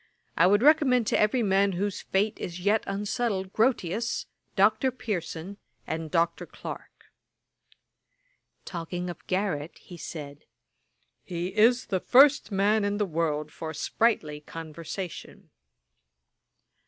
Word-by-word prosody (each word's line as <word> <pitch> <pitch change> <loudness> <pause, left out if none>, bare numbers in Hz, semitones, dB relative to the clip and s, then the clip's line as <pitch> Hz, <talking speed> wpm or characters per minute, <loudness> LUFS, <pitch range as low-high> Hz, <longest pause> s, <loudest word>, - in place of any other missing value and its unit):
I 170 - +5
would 205 +4 +4
recommend 280 -6 +5
to - - +2
every 220 +3 +2
man 195 0 +3
whose 195 +2 -2
faith 205 +3 0
is 175 0 -5
yet 205 +4 +2
unsettled, 200 -1 -2
Grotius, 230 -2 0 0.3
Dr. 265 - +4
Pearson, 200 -6 -5 0.3
and 160 0 -4
Dr. 170 +1 0
Clarke.' - - -10 1.5
Talking 175 0 -4
of 170 - -14
Garrick, 185 -5 -2
he 175 - -12
said, 145 -3 -8 0.8
'He 180 +1 -4
is 240 +4 +4
the 190 - -1
first 275 +4 +5
man 205 +2 +2
in 205 0 0
the 210 - +1
world 155 -3 -1
for 160 -1 -6
sprightly 155 -4 0
conversation.' 165 +3 -8
190 Hz, 115 wpm, -27 LUFS, 170-215 Hz, 1.5 s, I